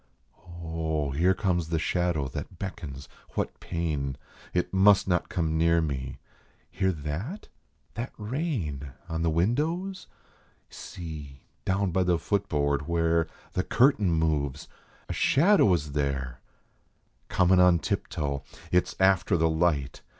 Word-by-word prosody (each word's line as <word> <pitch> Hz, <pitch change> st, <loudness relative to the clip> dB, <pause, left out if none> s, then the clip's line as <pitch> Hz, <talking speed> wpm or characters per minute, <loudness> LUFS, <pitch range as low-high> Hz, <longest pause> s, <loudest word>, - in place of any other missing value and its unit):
Oh, 80 Hz, -3 st, -2 dB
here 90 Hz, +7 st, +3 dB
comes 90 Hz, -4 st, 0 dB
the 80 Hz, -, +1 dB
shadow 85 Hz, -3 st, 0 dB
that 90 Hz, -, -7 dB
beckons 80 Hz, -7 st, -6 dB, 0.3 s
what -, -, -2 dB
pain? 75 Hz, -6 st, -2 dB, 0.3 s
It 90 Hz, +1 st, -1 dB
must 95 Hz, +1 st, +5 dB
not 90 Hz, -2 st, +1 dB
come 80 Hz, -2 st, 0 dB
near 85 Hz, 0 st, +4 dB
me! 70 Hz, -5 st, -3 dB, 0.5 s
Hear 95 Hz, 0 st, +1 dB
that? 85 Hz, -, -5 dB, 0.4 s
That 115 Hz, +5 st, -4 dB
rain 105 Hz, -, -3 dB, 0.2 s
On 80 Hz, 0 st, -2 dB
the 85 Hz, -, +2 dB
windows? 155 Hz, -, 0 dB, 0.6 s
See, 75 Hz, -6 st, -8 dB, 0.2 s
down 95 Hz, 0 st, +1 dB
by 95 Hz, +2 st, +2 dB
the 90 Hz, -1 st, +2 dB
foot 100 Hz, +3 st, -1 dB
board, 70 Hz, -1 st, 0 dB
where 85 Hz, -1 st, +2 dB, 0.3 s
The 90 Hz, -, +1 dB
curtain 120 Hz, -7 st, +3 dB
moves! 75 Hz, -4 st, 0 dB, 0.4 s
A -, -, -3 dB
shadow 170 Hz, -, +4 dB
is 75 Hz, -5 st, 0 dB
there, 70 Hz, -4 st, -2 dB, 0.9 s
Comin 90 Hz, 0 st, +4 dB
on 90 Hz, -1 st, +6 dB
tiptoe! 70 Hz, -3 st, -2 dB, 0.3 s
It 90 Hz, 0 st, +3 dB
s -, -, -8 dB
after 95 Hz, -1 st, +4 dB
the 80 Hz, 0 st, +2 dB
light. 80 Hz, -5 st, 0 dB
85 Hz, 130 wpm, -27 LUFS, 75-95 Hz, 0.9 s, on